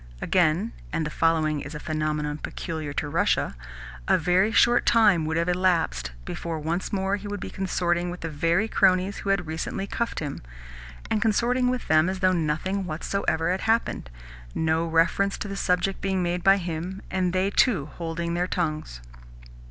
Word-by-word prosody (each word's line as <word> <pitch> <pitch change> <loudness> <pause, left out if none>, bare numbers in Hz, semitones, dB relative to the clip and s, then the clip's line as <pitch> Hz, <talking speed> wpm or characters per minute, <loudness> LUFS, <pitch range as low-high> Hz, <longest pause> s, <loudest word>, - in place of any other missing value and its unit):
Again 180 - +1 0.2
(and 160 - -1
the 150 - -4
following 155 -2 +1
is 145 +3 -8
a - - -5
phenomenon 150 -1 -2
peculiar 160 -4 -5
to 150 - -2
Russia) 145 - +1 0.5
a - - +5
very 180 +5 +2
short 240 +2 +4
time 205 -8 +5
would 160 +1 -1
have 170 +1 +1
elapsed 175 - +1
before 165 - -4
once 165 +4 -2
more 195 0 0
he 205 +1 -8
would 205 0 -4
be - - -6
consorting 175 -2 -1
with 175 0 -7
the 165 - -3
very 165 +7 +1
cronies 185 -1 +2
who 200 - -4
had 195 -3 +1
recently 160 +4 -3
cuffed 235 +3 -3
him 145 -3 -5 0.7
and 215 - +1
consorting 240 +3 +2
with 250 -1 -3
them 155 +2 +4
as 190 - -2
though 185 -1 +3
nothing 180 +4 -1
whatsoever 165 0 -1
had 185 - -1
happened 225 - 0 0.5
no 160 +1 +1
reference 170 +5 +2
to - - -5
the 195 - -5
subject 180 0 0
being 190 -2 0
made 175 0 -1
by 195 0 +6
him, 180 +2 -5
and 185 -1 +1
they 185 +2 +1
too 200 - +3
holding 170 0 -3
their 175 +1 0
tongues. 155 - -3
175 Hz, 175 wpm, -25 LUFS, 160-195 Hz, 0.7 s, by